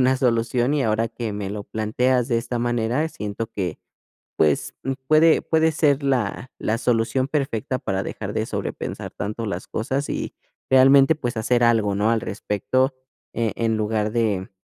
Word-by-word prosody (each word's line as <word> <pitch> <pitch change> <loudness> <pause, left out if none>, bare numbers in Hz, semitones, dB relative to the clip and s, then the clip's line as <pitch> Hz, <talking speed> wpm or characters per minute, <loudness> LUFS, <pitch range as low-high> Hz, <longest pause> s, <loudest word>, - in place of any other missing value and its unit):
una 130 +1 +4
solución, 120 +1 +1
y 145 - +1
ahora 110 0 +1
que 115 -1 -5
me 100 -1 -4
lo 105 0 -5
planteas 120 +4 0
de 115 - +2
esta 120 +1 -3
manera, 120 +5 0
siento 105 -4 -5
que, 90 -5 -3 0.6
pues, 75 -2 +1 0.3
puede 155 +1 +5
puede 160 0 +2
ser 145 -2 +2
la 130 -2 -1
la 110 - 0
solución 120 +1 +1
perfecta 135 -4 -1
para 95 0 -1
dejar - - -5
de - - 0
sobrepensar - - -4
tanto 110 +4 -4
las 95 -3 -4
cosas 135 +6 -2
y - - -3 0.4
realmente, 135 +3 +6
pues, 125 -5 -3
hacer 120 +2 +2
algo, 110 -4 +3
¿no?, 105 +3 +2
al 115 - +2
respecto, 130 +6 -1 0.4
eh, 115 -2 0
en 115 -1 +1
lugar 110 0 0
de 105 -5 0
115 Hz, 165 wpm, -23 LUFS, 110-130 Hz, 0.6 s, realmente